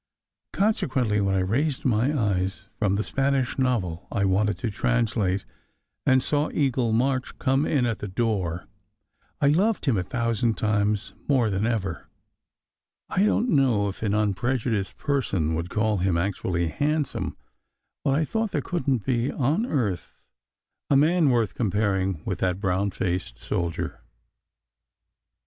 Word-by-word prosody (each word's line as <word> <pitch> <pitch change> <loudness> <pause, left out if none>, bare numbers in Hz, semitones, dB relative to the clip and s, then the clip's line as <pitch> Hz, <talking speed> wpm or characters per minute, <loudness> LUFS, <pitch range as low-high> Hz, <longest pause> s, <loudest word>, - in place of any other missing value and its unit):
Consequently, 130 - +1
when 95 -1 +1
I 95 - +2
raised 130 +10 0
my 125 +2 +2
eyes 100 -1 -1
from 100 -3 +2
the 105 - 0
Spanish 135 0 0
novel 105 -10 0
I 100 -3 +1
wanted 105 +2 +2
to 120 -4 -3
translate, 105 -5 0 0.6
and 130 0 +5
saw 145 +1 +1
Eagle 130 -5 +1
March 130 +3 0
come 135 +3 +1
in 135 -5 +2
at 115 -2 -1
the 105 - -4
door, 95 -5 -1 0.7
I 140 - +4
loved 195 +8 +2
him 130 -8 +2
a - - -1
thousand 115 +2 0
times 105 -1 0
more 125 -7 +3
than 100 +3 0
ever. 95 -8 -2 1.0
I 195 - +2
don 220 - +2
t 250 - 0
know 120 -8 +3
if 95 - -8
an 105 -2 0
unprejudiced 105 0 0
person 100 - 0
would 85 +2 -2
call 105 0 +1
him 90 -1 +1
actually 85 -2 -1
handsome; 150 - -1 0.7
but 135 - +2
I 155 - +1
thought 220 +5 -1
there - - -1
couldn 135 - -1
t - - -26
be 125 0 +1
on 150 - 0
earth 105 - -2 0.7
a 140 - +5
man 160 +1 +4
worth 115 -5 +1
comparing 95 -5 0
with 95 -5 -2
that 90 0 0
brown 95 0 0
faced 90 -8 -3
soldier. 85 +6 -3
110 Hz, 150 wpm, -25 LUFS, 95-135 Hz, 1.0 s, and